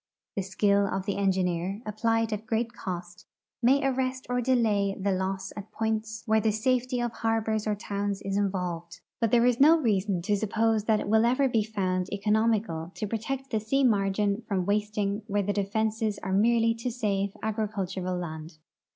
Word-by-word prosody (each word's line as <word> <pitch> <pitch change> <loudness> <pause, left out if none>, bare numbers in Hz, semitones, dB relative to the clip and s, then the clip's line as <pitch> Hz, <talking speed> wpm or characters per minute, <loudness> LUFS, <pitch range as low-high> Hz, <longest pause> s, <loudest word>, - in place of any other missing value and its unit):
The 195 - 0
skill 200 +1 +2
of 190 -1 -3
the 200 - -1
engineer, 185 -1 0
applied 225 +1 0
at 215 +1 -5
great 230 +1 -1
cost, 175 -4 -7 0.3
may 270 +3 +4
arrest 260 -1 -1
or 250 0 +1
dela}' 220 -6 +2
the 200 +1 0
loss 190 0 -2
at 205 0 -8
points 220 0 -2
where 220 -1 +3
the 220 - +2
safety 250 +3 0
of 240 -1 -1
harbors 220 -1 -1
or 210 - +1
towns 200 -1 -3
is 195 0 -2
involved, 180 -4 -2 0.2
but 230 - +2
tliere 240 +1 +4
is 245 -1 +2
no 310 +4 +7
reason 200 - 0
to 205 +3 +1
suppose 220 +1 +1
that 220 -1 +3
it - - -5
will 220 +2 +4
ever 255 +4 +3
be 225 -4 +1
found 185 -4 -2
economical 210 -5 0
to 215 - -3
protect 255 +6 -4
the 220 - +1
sea 270 +6 +1
margin 200 -2 +2
from 190 -4 0
wasting 210 0 0
where 205 0 0
the 205 +1 -1
defenses 215 +1 -1
are 190 - -2
merel}'' 230 +2 +3
to 250 - -2
save 200 -5 -1
agricultural 195 -4 -2
land. 160 -2 -6
210 Hz, 175 wpm, -28 LUFS, 195-225 Hz, 0.3 s, no